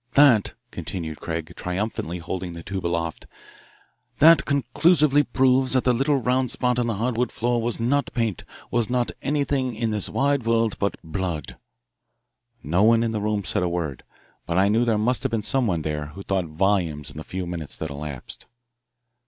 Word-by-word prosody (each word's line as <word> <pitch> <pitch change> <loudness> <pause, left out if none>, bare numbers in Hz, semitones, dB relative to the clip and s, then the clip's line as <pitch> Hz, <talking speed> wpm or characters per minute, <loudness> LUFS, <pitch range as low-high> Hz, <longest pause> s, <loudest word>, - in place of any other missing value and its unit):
"That," 140 -8 +5 0.2
concluded 80 -4 -5
Craig, 80 0 -4
triumphantly 90 -2 -3
holding 90 +1 -5
the 85 -1 -8
tube 95 -3 -3
aloft, 85 -1 -3 0.9
"that 165 +3 +7
conclusively 145 +1 +3
proves 130 -1 +2
that 130 - +3
the 125 - +3
little 135 +4 +2
round 125 0 +1
spot 125 -1 +1
on 120 - 0
the 115 - -1
hardwood 120 +3 -1
floor 120 0 0
was 115 +1 -2
not 140 +5 +1
paint, 115 -6 -1 0.3
was 120 -2 +1
not 125 -1 0
anything 140 -3 0
in 115 0 -1
this 105 -2 0
wide 140 -1 +1
world 115 -2 +2
but 100 - -1
blood." 80 -3 -4 1.1
No 85 +6 +1
one 115 +2 +5
in 115 - 0
the 110 -2 -2
room 105 -1 -1
said - - -1
a 90 - +1
word, 85 -6 -3 0.5
but 85 - -1
I 95 +1 +4
knew 115 +3 +3
there 115 -2 +2
must 120 +4 +1
have 135 - -1
been 115 -3 -1
someone 105 - +1
there 75 -1 -3
who 100 +6 -10
thought 95 -2 0
volumes 80 -3 0
in - - -13
the 75 - -5
few 90 +2 -5
minutes 85 -4 -5
that 80 -2 -5
elapsed. 70 -3 -7
110 Hz, 180 wpm, -24 LUFS, 85-125 Hz, 1.1 s, that